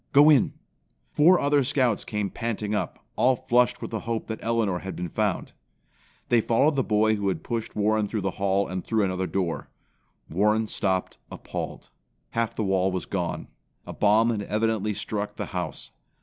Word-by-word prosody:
Go 145 +2 +8
in!" 140 -5 +4 0.6
Four 175 +4 +5
other 145 0 +3
Scouts 125 -5 +1
came 105 -2 -2
panting 110 -3 -3
up, 105 - -3
all 130 +1 +4
flushed 125 0 +1
with - - -5
the 110 - -2
hope 115 0 -3
that 110 - -6
Elinor 115 -6 +1
had 95 +1 -6
been 90 -1 -4
found. - - -1 0.8
They 120 -2 +4
followed 140 +8 +2
the 135 - +2
boy 110 0 +2
who 100 -1 -2
had 90 -5 -1
pushed 115 -2 -4
Warren 105 0 +2
through 110 0 -2
the 95 0 -1
hall 100 0 +2
and 95 0 -4
through 110 -2 +1
another 95 -1 -1
door. 90 -4 -2 0.6
Warren 105 +6 +2
stopped 95 -7 -1
appalled. - - -6 0.4
Half 115 -1 -1
the 110 - -1
wall 95 -1 +2
was 90 -1 -3
gone. 90 -3 -3 0.4
A - - -7
bomb 110 +3 +4
had 110 -3 -2
evidently 105 0 0
struck 105 0 -4
the - - -4
house. 90 -5 -4
105 Hz, 180 wpm, -26 LUFS, 95-115 Hz, 0.8 s, Go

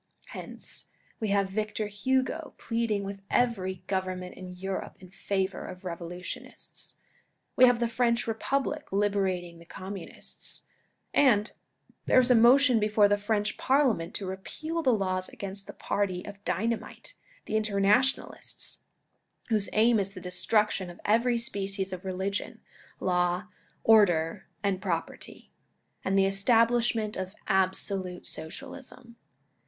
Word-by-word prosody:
Hence - - -5 0.3
we 220 - -1
have 200 -1 +1
Victor 215 +1 -2
Hugo 260 +9 -1
pleading 230 -3 -1
with 195 0 -6
every 190 -7 0
Government 185 -1 -3
in 185 -1 -9
Europe 190 +1 -5
in 185 -1 -14
favour 190 0 -2
of 185 +1 -10
revolutionists; 175 +1 -7 0.6
we 255 - +8
have 245 -1 +4
the 235 - +2
French 235 0 +1
Republic 275 +6 -2
liberating 190 -4 0
the 170 - -14
Communists; 190 +1 -9 0.5
and 225 -6 +4 0.6
there - - +6
is 255 0 +4
a - - +7
motion 245 +1 +6
before 210 0 +4
the 205 - +3
French 205 0 -1
Parliament 260 - +2
to 200 - -3
repeal 310 - -4
the 260 - +3
laws 185 -4 0
against 200 0 -7
the - - -6
party 185 -3 -2
of 200 -1 -10
dynamite 225 - -2 0.2
— - - -29
the - - -6
Interna 210 -1 +4
tionalists, 265 +1 -4 0.7
whose 215 -3 +1
aim 225 +1 +4
is 195 0 -1
the 185 - -8
destruction 185 +1 +1
of 175 - -11
every 235 +3 +3
species 195 -4 -2
of 185 +1 -6
religion, 190 +2 -3 0.4
law, 180 +2 0 0.3
order 190 -4 +4 0.2
and 195 -2 0
property, 170 -4 -4 0.5
and 195 +1 +1
the 195 - +5
establishment 225 +2 +3
of 190 +2 -5
absolute 190 -1 0
Socialism. 235 - -7
200 Hz, 130 wpm, -28 LUFS, 185-230 Hz, 0.7 s, we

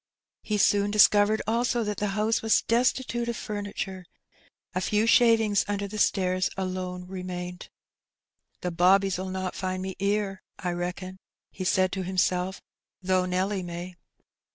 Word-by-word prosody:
He 210 - -1
soon 205 0 +3
discovered 210 0 +5
also 235 +2 +1
that 210 -1 -3
the 210 - -1
house 220 +2 +1
was 225 -1 +3
destitute 240 0 +1
of 235 - -3
frimiture; 200 -3 -5 0.7
a 185 - -1
few 210 +3 +1
shavings 225 -3 +4
under 200 0 -2
the 210 +2 -6
stairs 185 -2 +2
alone 185 -1 -4
remained. 180 -1 -6 0.9
''The 180 -2 -3
bobbies 190 +2 +4
'11 185 0 -4
not 185 -1 -3
find 185 -1 -3
me 190 -1 -5
'ere, 200 -1 -1 0.2
I 180 - -3
reckon," 180 +2 -5 0.3
he 185 - -6
said 185 0 +2
to 195 - -3
himself, 185 0 0 0.4
''though 185 0 +2
Nelly 190 +2 0
may.'' 175 +1 -7
190 Hz, 145 wpm, -27 LUFS, 185-210 Hz, 0.9 s, discovered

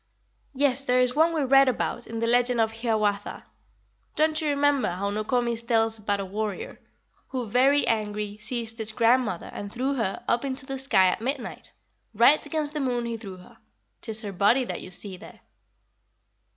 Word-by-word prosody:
"Yes, 275 -1 +2
there 250 -2 +2
is 250 0 +2
one 320 +4 +3
we 315 -3 0
read 270 +1 +5
about 240 -1 -3
in 225 0 -5
the - - +1
legend 245 +1 +3
of 220 -1 +2
Hiawatha. 215 -3 -1 0.7
Don't 310 0 +2
you 305 - 0
remember 285 -1 +2
how 195 +3 -3
Nokomis 235 +2 -1
tells 225 -2 +1
about 205 -1 -1
a 195 - -3
warrior 215 - -4 0.2
"'... - - -40
Who 255 -2 -3
very 265 +6 +3
angry 210 -2 -2
Seized 230 +1 -3
his 220 0 -2
grandmother, 230 -5 +1
and 205 0 -6
threw 260 +4 -1
her 225 -8 -2
Up 235 - +1
into 265 -1 -4
the 270 -1 -5
sky 265 -8 +3
at 180 - -3
midnight, 265 +5 -5 0.4
Right 240 +8 +5
against 305 -2 -3
the 305 - -3
moon 245 -3 -1
he 235 -1 -3
threw 200 -5 -9
her: 180 - -17 0.4
'Tis 220 -2 -3
her 200 -2 -5
body 205 +8 +3
that - - -5
you - - -9
see 185 +1 -6
there.'" - - -14
235 Hz, 185 wpm, -26 LUFS, 210-270 Hz, 0.7 s, read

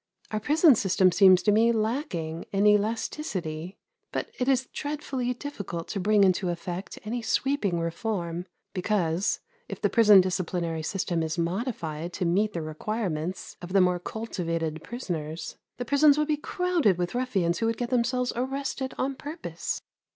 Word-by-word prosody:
Our 215 - 0
prison 300 - +5
system 190 -4 +3
seems 185 0 +6
to 210 - +4
me 225 +3 +4
lacking 215 - -2
in 200 +1 +2
elasticity; 205 - 0 0.3
but - - -3
it 250 - 0
is 265 -1 +3
dreadfully 280 -4 -3
difficult 200 -11 -6
to 200 - -2
bring 205 +2 +4
into 185 -1 +2
effect 175 +2 -5
any 235 +3 -3
sweeping 220 -6 0
reform; 170 0 -3 0.3
because 185 -2 0 0.3
if - - -6
the - - +1
prison 210 -4 +7
disciplinary 180 -3 -1
system 175 0 -1
is 160 +1 -2
modified 170 - -3
to 180 - -2
meet 205 +5 +2
the 165 - -3
requirements 175 +1 -3
of 175 +1 -7
the 195 - +6
more 180 -1 +3
cultivated 165 -7 -3
prisoners, 165 -9 -5 0.2
the 245 - -4
prisons 285 +3 +5
would 300 0 +1
be 305 - +3
crowded 335 - +1
with 175 -1 -2
ruffians 200 -9 0
who 225 - +1
would 225 0 0
get 240 +1 -3
themselves 250 +1 +1
arrested 265 +1 -3
on 275 +1 0
purpose. 300 +5 -5
200 Hz, 155 wpm, -27 LUFS, 175-245 Hz, 0.3 s, prison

